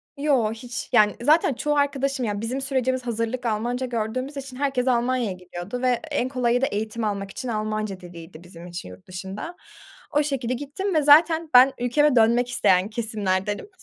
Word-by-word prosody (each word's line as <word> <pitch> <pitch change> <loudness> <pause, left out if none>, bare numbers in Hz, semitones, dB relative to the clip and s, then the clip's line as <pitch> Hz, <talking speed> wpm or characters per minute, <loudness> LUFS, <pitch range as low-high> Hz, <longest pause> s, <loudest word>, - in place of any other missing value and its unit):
Yo, 280 -7 +1
hiç 240 +2 -6
Yani 210 -3 +5
zaten 300 +2 +4
çoğu 295 +5 -1
arkadaşım 275 -2 0
yani 205 -1 -2
bizim 255 +4 -3
sürecimiz, 260 -2 -1
hazırlık 230 +2 -2
Almanca 240 +4 -1
gördüğümüz 250 +4 -3
için 265 -2 -7
herkes 270 -2 0
Almanya'ya 245 -3 +1
gidiyordu 180 +6 -7
ve 255 - +1 0.2
en 260 -3 0
kolayı 245 -1 +1
da - - +3
eğitim 220 0 -3
almak 200 -2 -3
için 255 - -6
Almanca 215 -3 -3
diliydi 170 -2 -12
bizim 175 -1 -12
için 175 - -7
yurt 90 0 -14
dışında. 190 - -7 0.6
O 295 +1 +2
şekilde 265 -4 -2
gittim 295 +9 -3
ve 310 - +4
zaten 320 +2 +5
ben 255 +2 +8
ülkeme 255 +4 +2
dönmek 235 +2 +4
isteyen 190 -5 +2
kesimlerdenim. 210 - -2
245 Hz, 170 wpm, -24 LUFS, 210-270 Hz, 0.6 s, ben